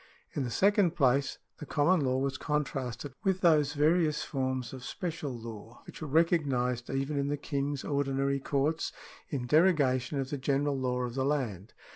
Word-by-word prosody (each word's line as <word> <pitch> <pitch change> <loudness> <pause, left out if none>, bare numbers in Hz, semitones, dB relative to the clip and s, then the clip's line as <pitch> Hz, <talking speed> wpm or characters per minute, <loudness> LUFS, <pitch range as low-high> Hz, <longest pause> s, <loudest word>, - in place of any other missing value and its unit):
In 145 - -1
the 125 - -2
second 195 - +3
place 140 -1 +2 0.2
the 150 - -6
common 165 +5 +3
law 130 -2 +1
was 135 0 -1
contrasted 140 -3 -2
with 190 -2 +1
those 155 -4 +4
various 155 +1 +2
forms 130 -3 -2
of 130 -1 -8
special 160 -1 -4
law 115 -1 -9
which - - -11
were 155 - -4
recognised 135 -6 +1
even 135 +2 -1
in 140 - 0
the 145 +1 -1
King's 140 -1 -2
ordinary 140 -1 0
courts 145 +4 0 0.4
in 135 -5 -3
derogation 145 -3 +3
of 135 0 -3
the 145 - -2
general 140 +2 +1
law 125 -1 -1
of 125 -1 -3
the 130 +1 -1
land. 120 -9 -2
140 Hz, 170 wpm, -30 LUFS, 130-150 Hz, 0.4 s, those